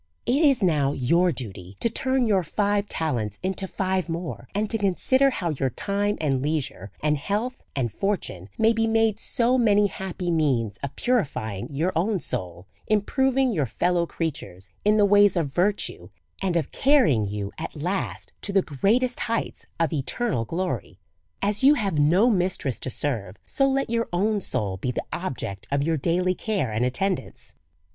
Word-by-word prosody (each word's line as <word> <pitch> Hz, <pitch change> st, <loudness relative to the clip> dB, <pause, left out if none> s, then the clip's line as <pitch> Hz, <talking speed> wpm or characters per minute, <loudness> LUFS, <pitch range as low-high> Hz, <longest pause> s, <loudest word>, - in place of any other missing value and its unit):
It 285 Hz, +6 st, +2 dB
is 275 Hz, -8 st, +4 dB
now 145 Hz, -6 st, +2 dB
your 170 Hz, +8 st, +2 dB
duty 95 Hz, -, -7 dB
to -, -, +1 dB
turn 260 Hz, +2 st, +1 dB
your 200 Hz, -4 st, +3 dB
five 205 Hz, +4 st, 0 dB
talents 120 Hz, -, -2 dB
into 190 Hz, +1 st, -1 dB
five 190 Hz, -1 st, -1 dB
more, 170 Hz, +1 st, -5 dB
and 210 Hz, +1 st, +1 dB
to 225 Hz, -, +1 dB
consider 260 Hz, +8 st, +3 dB
how 175 Hz, -10 st, -2 dB
your 135 Hz, -3 st, -1 dB
time 200 Hz, -, -1 dB
and 135 Hz, -4 st, 0 dB
leisure, 145 Hz, -, -2 dB
and 150 Hz, 0 st, +2 dB
health 220 Hz, -, -2 dB
and 125 Hz, -5 st, -1 dB
fortune, 145 Hz, -, -3 dB
may 225 Hz, +1 st, +4 dB
be 225 Hz, 0 st, +1 dB
made 225 Hz, -1 st, +2 dB
so 250 Hz, +1 st, +2 dB
many 210 Hz, -3 st, +4 dB
happy 190 Hz, -2 st, -3 dB
means 130 Hz, -11 st, +1 dB
of 140 Hz, -1 st, -5 dB
purifying 135 Hz, -, -1 dB
your 160 Hz, +6 st, -1 dB
own 190 Hz, +4 st, +1 dB
soul, 90 Hz, -, -4 dB, 0.2 s
improving 260 Hz, +4 st, +2 dB
your 150 Hz, -8 st, 0 dB
fellow 175 Hz, +6 st, +1 dB
creatures 100 Hz, -, -5 dB
in 210 Hz, +1 st, +4 dB
the 205 Hz, -, +5 dB
ways 205 Hz, -1 st, +5 dB
of 145 Hz, -5 st, -1 dB
virtue, 180 Hz, -, 0 dB, 0.3 s
and 185 Hz, -3 st, +1 dB
of 165 Hz, -, -2 dB
carrying 255 Hz, -, +3 dB
you 100 Hz, 0 st, -4 dB
at -, -, -5 dB
last 180 Hz, +6 st, -3 dB
to 200 Hz, -, -2 dB
the 195 Hz, -1 st, +3 dB
greatest 230 Hz, -, +1 dB
heights 230 Hz, -1 st, -3 dB
of 165 Hz, -2 st, +1 dB
eternal 145 Hz, -, -1 dB
glory. 165 Hz, -, -3 dB, 0.5 s
As 205 Hz, +3 st, +1 dB
you 285 Hz, +3 st, +7 dB
have 195 Hz, -, -1 dB
no 175 Hz, +10 st, +4 dB
mistress 180 Hz, -, 0 dB
to -, -, -2 dB
serve, 115 Hz, -9 st, -3 dB
so 275 Hz, -, +1 dB
let 270 Hz, -3 st, 0 dB
your 230 Hz, 0 st, 0 dB
own 205 Hz, +4 st, +1 dB
soul 100 Hz, -, -1 dB
be 125 Hz, -, -3 dB
the 125 Hz, -, -3 dB
object 125 Hz, -, -4 dB
of 140 Hz, 0 st, +1 dB
your 165 Hz, +2 st, +1 dB
daily 180 Hz, +5 st, +1 dB
care 190 Hz, -, -2 dB
and 110 Hz, +3 st, 0 dB
attendance. 180 Hz, +9 st, -2 dB
180 Hz, 170 wpm, -25 LUFS, 135-210 Hz, 0.5 s, you